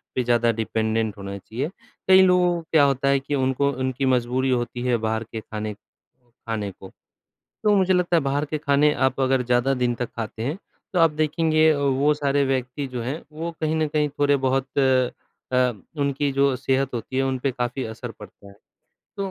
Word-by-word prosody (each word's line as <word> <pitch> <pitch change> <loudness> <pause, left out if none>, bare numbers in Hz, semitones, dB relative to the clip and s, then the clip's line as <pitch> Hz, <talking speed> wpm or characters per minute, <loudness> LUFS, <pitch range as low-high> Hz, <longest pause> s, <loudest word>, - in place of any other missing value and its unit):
पे 125 - +1
ज़्यादा 120 -1 +3
डिपेंडेंट 110 -1 -1
होना 100 0 -6
चाहिए। 125 - -4 0.4
कई 190 0 +8
लोगों 180 -1 +4
को 170 - -4
क्या 155 -3 +5
होता 140 -1 +1
है 140 0 +3
कि 140 +2 -3
उनको 135 +1 +1
उनकी 130 0 -2
मजबूरी 130 +1 +1
होती 120 -1 -1
है 120 -1 +3
बाहर 110 0 -1
के 110 - -4
ख़ाने 105 0 -5
ख़ाने 115 -2 -9
को। 95 +1 -13 0.8
तो 210 -1 +5
मुझे 190 -1 +3
लगता 180 -1 +2
है - - +4
बाहर 140 +2 0
के 155 +1 -3
ख़ाने 145 +1 +3
आप 130 +1 -2
अगर 130 -1 +2
ज़्यादा 125 +2 +2
दिन 120 -1 +2
तक 120 -1 -4
ख़ाते 110 0 -5
हैं 145 +10 -2 0.3
तो 180 - +1
आप 165 -1 +6
देखेंगे 155 0 +3
वो 140 +1 +2
सारे 140 -1 +1
व्यक्ति 130 +1 -2
जो 120 - -2
हैं 135 +7 -4
वो 165 +2 -4
कहीं 155 0 0
न 155 -1 +1
कहीं 150 0 +1
थोड़े-बहुत 135 -1 +1
अ, 130 -1 0 0.4
उनकी 140 0 0
जो 140 -1 +2
सेहत 135 0 0
होती 120 +3 -5
है 135 - +2
उनपे 135 0 -1
काफ़ी 125 +2 -3
असर 115 +2 -7
पड़ता 105 -1 -13
है। 100 - -15 0.6
तो 195 -1 -3
135 Hz, 190 wpm, -23 LUFS, 120-145 Hz, 0.8 s, कई